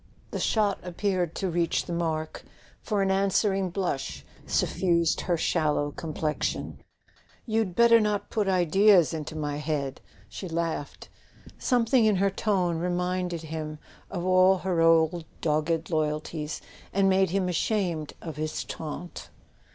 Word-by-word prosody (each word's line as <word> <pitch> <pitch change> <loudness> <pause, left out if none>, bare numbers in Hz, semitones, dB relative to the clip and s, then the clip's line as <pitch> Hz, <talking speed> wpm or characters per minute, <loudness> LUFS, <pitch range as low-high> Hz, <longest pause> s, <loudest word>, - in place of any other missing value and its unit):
The - - -3
shot 210 -3 +1
appeared 180 -1 -1
to 190 - -1
reach 170 0 0
the 175 - -4
mark, 160 -2 -2 0.4
for 205 -3 0
an 195 - +1
answer¬ 195 +1 +2
ing 190 -1 -1
blush 135 - -3 0.2
suffused 170 -3 +1
her 175 -2 0
sallow 150 -3 +1
complexion. 155 -1 -3 0.7
"You'd 220 -5 0
better 235 +1 +6
not 210 -2 -1
put 215 -3 0
ideas 185 0 +4
into 155 0 -5
my 145 -2 -2
head! 145 -3 -3
" - - -26
she 185 - -7
laughed. 165 -3 -3 0.5
Something 245 -1 +3
in 215 -2 +4
her 195 +1 +2
tone 185 -5 0
reminded 180 -1 -1
him 155 -1 -5 0.3
of 180 -2 -4
all 185 +1 +5
her 175 -3 +1
old 165 +1 +4 0.2
dogged 160 +2 0
loyalties, 155 0 -2 0.3
and 195 0 +2
made 190 -1 +3
him 185 +1 0
ashamed 175 -3 -1
of 160 -3 -6
his 155 0 -3
taunt. 165 +2 -7
175 Hz, 140 wpm, -27 LUFS, 155-195 Hz, 0.7 s, better